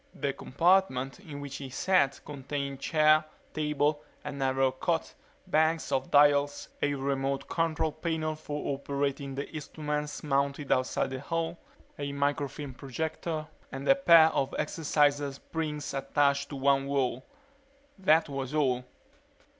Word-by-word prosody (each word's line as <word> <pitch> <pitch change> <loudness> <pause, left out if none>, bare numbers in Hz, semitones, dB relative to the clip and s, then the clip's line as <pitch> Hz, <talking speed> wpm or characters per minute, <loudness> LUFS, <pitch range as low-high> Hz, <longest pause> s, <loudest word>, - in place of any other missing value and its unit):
The 140 -2 -1
compartment 165 -4 +1
in 150 -8 -8
which 140 -1 -6
he 135 -2 -7
sat 140 -1 +2
contained 140 -1 -4
chair, 155 0 +4 0.3
table, 150 -1 0 0.2
a 145 - -4
narrow 135 -1 +1
cot, 165 +5 -1 0.3
banks 160 -2 +1
of 130 0 0
dials, 145 0 +4
a 145 0 +1
remote 135 0 -1
control 160 -1 0
panel 155 0 -2
for 150 -2 -4
operating 140 0 -2
the 140 - -4
instruments 150 -1 -4
mounted 140 0 0
outside 130 0 +1
the 130 - -4
hull, 165 +4 -3 0.4
a 140 0 -3
microfilm 140 -1 -2
projector, 155 +4 -4 0.3
and 135 0 -6
a - - +8
pair 170 -13 +7
of 135 -3 -1
exerciser 145 -2 +1
springs 150 0 -4
attached 140 0 +1
to 145 - -6
one 135 0 +2
wall. 130 -2 0 0.8
That 165 -3 +4
was 135 0 -4
all. 130 -4 +2
145 Hz, 130 wpm, -29 LUFS, 135-155 Hz, 0.8 s, a